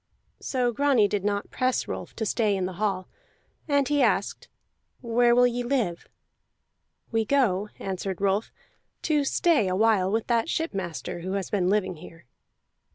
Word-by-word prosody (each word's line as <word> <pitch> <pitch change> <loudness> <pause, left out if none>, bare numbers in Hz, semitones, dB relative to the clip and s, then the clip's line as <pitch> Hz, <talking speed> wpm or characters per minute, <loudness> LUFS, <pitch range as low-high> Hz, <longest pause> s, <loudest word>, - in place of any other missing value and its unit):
So 250 -2 0
Grani 265 -4 +3
did 200 -1 -2
not 205 0 -2
press 255 -1 0
Rolf - - -6
to 220 - -2
stay 215 -2 +1
in 190 -1 -1
the 185 - -4
hall, 195 -3 -1 0.6
and 285 -2 +2
he 290 -1 +2
asked: 210 -5 0 0.5
"Where 240 0 +3
will 245 0 +6
ye 245 0 0
live?" 240 -9 -1 1.0
"We 225 -1 +1
go," 215 -6 +1
answered 190 -1 -4
Rolf, 200 +2 0 0.5
"to 300 -2 +2
stay 290 - +2
a 185 - 0
while 200 -3 +3
with 225 +1 0
that 235 +5 +1
shipmaster 185 - -3
who 185 +3 -4
has 195 -1 -3
been 185 -3 +1
living 190 -4 0
here." 165 0 -13
215 Hz, 160 wpm, -26 LUFS, 190-245 Hz, 1.0 s, will